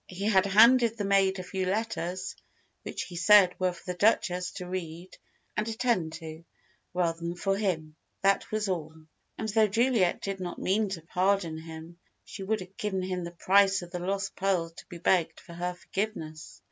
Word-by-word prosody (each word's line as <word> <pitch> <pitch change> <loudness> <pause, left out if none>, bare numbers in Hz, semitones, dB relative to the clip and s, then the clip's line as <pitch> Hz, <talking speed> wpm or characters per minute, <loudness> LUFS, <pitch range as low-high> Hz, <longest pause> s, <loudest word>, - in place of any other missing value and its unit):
He 185 +2 -5
had 200 -2 +4
handed 230 +3 +6
the 205 - -2
maid 195 -1 +3
a 185 - -5
few 185 +1 -3
letters, 185 -3 -2 0.5
which - - -5
he 180 - -10
said 185 +1 +6
were 185 -1 +2
for 175 - -13
the 180 - -7
Duchess 180 -4 +2
to 180 -2 -7
read 180 -1 -6 0.4
and 210 +1 -1
attend 225 -8 0
to, 160 0 -8 0.5
rather 170 -2 0
than 170 +1 -4
for 195 +2 0
him. 165 -7 -2 0.3
That 195 0 +2
was 215 -1 -1
all. 160 -4 -3 0.4
And 220 - -3
though 215 0 +4
Juliet 225 -3 +2
did 195 -1 -3
not 180 -2 -5
mean 205 +2 +1
to 175 -4 -5
pardon 180 -2 0
him, 160 +1 -10 0.3
she 200 - -9
would 210 +2 -1
have 185 +1 -12
given 185 -3 -2
the 170 - -4
price 195 0 +4
of 175 - -11
the 180 - -4
lost 195 +2 -2
pearls 180 -4 0
to 175 - -11
be 175 - -9
begged 170 0 +1
for 170 - -13
her 180 +1 -3
forgiveness. 165 - -5
185 Hz, 185 wpm, -28 LUFS, 175-200 Hz, 0.5 s, handed